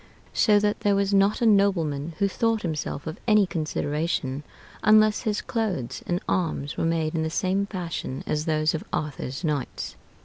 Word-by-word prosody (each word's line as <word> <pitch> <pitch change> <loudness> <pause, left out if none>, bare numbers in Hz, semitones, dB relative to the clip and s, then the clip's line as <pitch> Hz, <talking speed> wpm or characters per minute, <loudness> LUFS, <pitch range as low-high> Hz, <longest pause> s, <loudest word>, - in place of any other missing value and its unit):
So 210 -2 +4
that 210 0 0
there 205 -1 +2
was 200 0 +1
not 200 +4 +3
a - - +4
nobleman 170 -8 +2
who 200 - +2
thought 225 +2 0
himself 155 -3 -3
of 160 0 -6
any 210 -2 +5
consideration 150 -4 -2 0.4
unless 215 0 +5
his 215 -3 -1
clothes 195 - -2
and 175 0 0
arms 160 -5 -1
were - - -1
made 165 -1 0
in 160 - 0
the 160 - -1
same 190 +4 0
fashion 170 -8 -4
as 150 +1 -1
those 155 -1 +1
of 160 - -3
Arthur's 145 -1 -3
knights. 150 -5 -3
170 Hz, 170 wpm, -25 LUFS, 155-205 Hz, 0.4 s, any